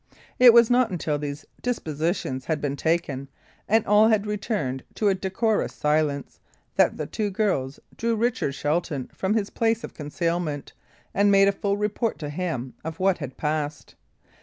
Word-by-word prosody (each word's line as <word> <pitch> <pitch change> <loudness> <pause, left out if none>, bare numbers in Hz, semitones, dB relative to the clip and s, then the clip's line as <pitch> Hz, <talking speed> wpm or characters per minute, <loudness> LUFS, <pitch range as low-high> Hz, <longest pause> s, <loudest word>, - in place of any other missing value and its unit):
It 250 -1 +10
was 235 0 +6
not 245 -1 +4
until 160 -5 -2
these 145 0 -5 0.2
dispositions 155 - -2
had 160 -2 -1
been 145 -1 -2
taken, 150 -4 -1 0.4
and 220 +1 +3
all 210 +1 +5
had 215 -2 +2
returned 205 - -2
to 210 - +2
a - - +4
decorous 195 +4 -1
silence, 150 -1 0 0.4
that - - +3
the - - -3
two 215 -2 -2
girls 185 -10 -1 0.2
drew 230 0 0
Richard 230 - 0
Shelton 150 -3 -2
from 195 +3 -1
his 205 -3 -1
place 230 -1 +1
of - - -7
concealment, 160 -1 -3 0.4
and 205 0 +3
made 195 0 +6
a - - +5
full 200 0 -1
report 210 +2 -1
to 150 -3 -5
him 145 -7 -3
of 160 0 -6
what 190 -1 +2
had 135 -4 -7
passed. 150 -1 -3
180 Hz, 165 wpm, -25 LUFS, 150-210 Hz, 0.4 s, It